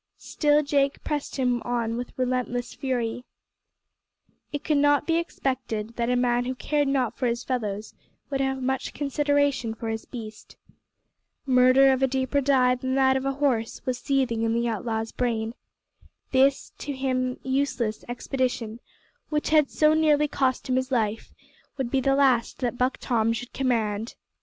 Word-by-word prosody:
Still 295 Hz, -1 st, +2 dB
Jake 280 Hz, -1 st, 0 dB
pressed 295 Hz, -2 st, -3 dB
him 250 Hz, -3 st, +1 dB
on 235 Hz, -2 st, -1 dB
with 245 Hz, +1 st, -6 dB
relentless 250 Hz, -1 st, -1 dB
fury. 245 Hz, -3 st, -2 dB, 1.3 s
It 290 Hz, 0 st, -4 dB
could 300 Hz, -2 st, +2 dB
not 290 Hz, 0 st, +3 dB
be 330 Hz, 0 st, +2 dB
expected 250 Hz, -9 st, -3 dB
that 235 Hz, 0 st, 0 dB
a 250 Hz, -, +2 dB
man 245 Hz, 0 st, +1 dB
who 255 Hz, +1 st, -3 dB
cared 290 Hz, +2 st, 0 dB
not 255 Hz, -4 st, 0 dB
for 255 Hz, -, -1 dB
his 235 Hz, 0 st, -1 dB
fellows 215 Hz, -5 st, -3 dB, 0.4 s
would 275 Hz, -1 st, 0 dB
have 265 Hz, -1 st, -1 dB
much 265 Hz, +1 st, -2 dB
consideration 285 Hz, -4 st, +1 dB
for 225 Hz, 0 st, -5 dB
his 220 Hz, 0 st, -4 dB
beast. 220 Hz, -3 st, -9 dB, 0.9 s
Murder 260 Hz, +1 st, +6 dB
of 260 Hz, 0 st, +1 dB
a 265 Hz, -, +4 dB
deeper 265 Hz, +2 st, 0 dB
dye 255 Hz, -2 st, +4 dB
than 260 Hz, +1 st, -2 dB
that 265 Hz, -1 st, +4 dB
of 265 Hz, 0 st, -1 dB
a 275 Hz, -, 0 dB
horse 265 Hz, -5 st, -1 dB
was 250 Hz, -1 st, -1 dB
seething 260 Hz, -5 st, 0 dB
in 225 Hz, 0 st, +1 dB
the 235 Hz, 0 st, +1 dB
outlaw's 225 Hz, 0 st, -2 dB
brain. 230 Hz, -2 st, -1 dB, 0.8 s
This 270 Hz, +1 st, +3 dB
to 285 Hz, -, -4 dB
him 255 Hz, -1 st, -1 dB
useless 260 Hz, -5 st, -1 dB
expedition, 245 Hz, -2 st, -2 dB, 0.5 s
which 300 Hz, -1 st, -1 dB
had 305 Hz, -3 st, +5 dB
so 305 Hz, 0 st, +3 dB
nearly 300 Hz, -1 st, +3 dB
cost 260 Hz, -3 st, 0 dB
him 255 Hz, 0 st, +1 dB
his 260 Hz, +1 st, -2 dB
life, 225 Hz, -3 st, -1 dB, 0.5 s
would 260 Hz, -3 st, -2 dB
be 270 Hz, -, +2 dB
the 270 Hz, +1 st, +2 dB
last 260 Hz, -4 st, +2 dB
that 245 Hz, -1 st, -1 dB
Buck 250 Hz, +2 st, 0 dB
Tom 230 Hz, -2 st, +1 dB
should 240 Hz, +2 st, -6 dB
command. 225 Hz, -4 st, -1 dB
255 Hz, 165 wpm, -26 LUFS, 235-275 Hz, 1.3 s, Murder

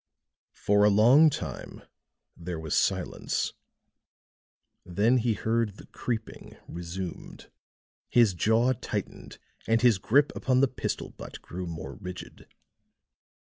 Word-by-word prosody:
For 105 Hz, 0 st, +2 dB
a 105 Hz, -, +6 dB
long 120 Hz, +10 st, +6 dB
time -, -, -7 dB, 0.5 s
there 85 Hz, -1 st, -6 dB
was 80 Hz, -2 st, -4 dB
silence; -, -, 0 dB, 1.3 s
then 105 Hz, +8 st, +2 dB
he 115 Hz, -2 st, +1 dB
heard 110 Hz, -2 st, -1 dB
the -, -, -12 dB
creeping 115 Hz, -3 st, -6 dB
resumed; 85 Hz, +1 st, -7 dB, 0.6 s
his 115 Hz, -5 st, +4 dB
jaw 110 Hz, +7 st, +2 dB
tightened 115 Hz, -, -6 dB, 0.3 s
and 115 Hz, +1 st, +2 dB
his 115 Hz, -6 st, +5 dB
grip 140 Hz, +9 st, +3 dB
upon 130 Hz, -1 st, +1 dB
the 140 Hz, -, +4 dB
pistol 130 Hz, -, -4 dB
butt -, -, -10 dB
grew 90 Hz, +1 st, -6 dB
more 80 Hz, -5 st, -6 dB
rigid. 90 Hz, 0 st, -9 dB
110 Hz, 115 wpm, -27 LUFS, 90-120 Hz, 1.3 s, a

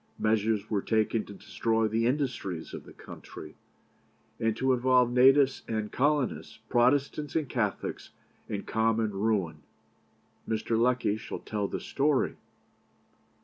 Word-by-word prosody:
Measures 110 Hz, -1 st, +1 dB
were 105 Hz, -3 st, 0 dB
taken 110 Hz, 0 st, +1 dB
to 100 Hz, -, -11 dB
destroy 110 Hz, +3 st, 0 dB
the 115 Hz, +2 st, +1 dB
industries 125 Hz, -, -2 dB
of -, -, -7 dB
the -, -, -13 dB
country, -, -, -11 dB, 0.8 s
and 115 Hz, -1 st, 0 dB
to 130 Hz, 0 st, +2 dB
involve 125 Hz, -1 st, +3 dB
natives 135 Hz, +2 st, +5 dB
and 110 Hz, -2 st, -3 dB
colonists, 145 Hz, -1 st, 0 dB
Protestants 140 Hz, +4 st, +1 dB
and 155 Hz, -3 st, 0 dB
Catholics, 115 Hz, -5 st, -3 dB, 0.4 s
in 100 Hz, -1 st, -3 dB
common 110 Hz, -1 st, +1 dB
ruin. 95 Hz, -6 st, -1 dB, 0.9 s
Mr. 110 Hz, +1 st, -1 dB
Lecky 120 Hz, -2 st, +2 dB
shall -, -, -6 dB
tell 105 Hz, -2 st, -3 dB
the -, -, -4 dB
story. 140 Hz, -1 st, 0 dB
115 Hz, 125 wpm, -29 LUFS, 110-130 Hz, 0.9 s, natives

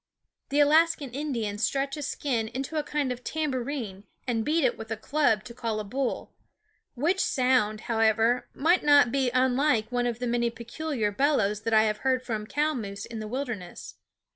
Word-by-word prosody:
The 285 Hz, -, +1 dB
Alaskan 310 Hz, -1 st, +4 dB
Indians 235 Hz, -7 st, -3 dB
stretch 275 Hz, 0 st, 0 dB
a 300 Hz, -, -6 dB
skin 250 Hz, -5 st, -2 dB
into 265 Hz, +7 st, -5 dB
a -, -, +2 dB
kind 290 Hz, -3 st, -1 dB
of 250 Hz, 0 st, -6 dB
tam 310 Hz, -2 st, -2 dB
bourine 240 Hz, -7 st, -4 dB, 0.2 s
and 230 Hz, -3 st, 0 dB
beat 315 Hz, +4 st, +1 dB
it 255 Hz, -, +2 dB
with 225 Hz, 0 st, -9 dB
a 225 Hz, -, -3 dB
club 225 Hz, -3 st, +1 dB
to 235 Hz, -, -10 dB
call 230 Hz, -3 st, -3 dB
a -, -, -3 dB
bull; 255 Hz, +5 st, -3 dB, 0.6 s
which 335 Hz, +10 st, +1 dB
sound, 250 Hz, -, +2 dB
however, 225 Hz, +1 st, +2 dB
might 340 Hz, +5 st, +3 dB
not 285 Hz, -5 st, +6 dB
be 265 Hz, -1 st, +1 dB
unlike 255 Hz, -2 st, +2 dB
one 245 Hz, 0 st, 0 dB
of 235 Hz, -2 st, -2 dB
the 250 Hz, -, -3 dB
many 235 Hz, 0 st, +1 dB
peculiar 235 Hz, 0 st, -3 dB
bellows 210 Hz, -5 st, +1 dB
that 225 Hz, +1 st, -2 dB
I 215 Hz, -, +6 dB
have 215 Hz, -1 st, 0 dB
heard 260 Hz, 0 st, 0 dB
from 220 Hz, -4 st, -4 dB
cow 300 Hz, +4 st, 0 dB
moose 200 Hz, -6 st, -5 dB
in 230 Hz, -1 st, -7 dB
the 215 Hz, -, -5 dB
wilderness. 225 Hz, -7 st, -6 dB
250 Hz, 190 wpm, -27 LUFS, 220-285 Hz, 0.6 s, not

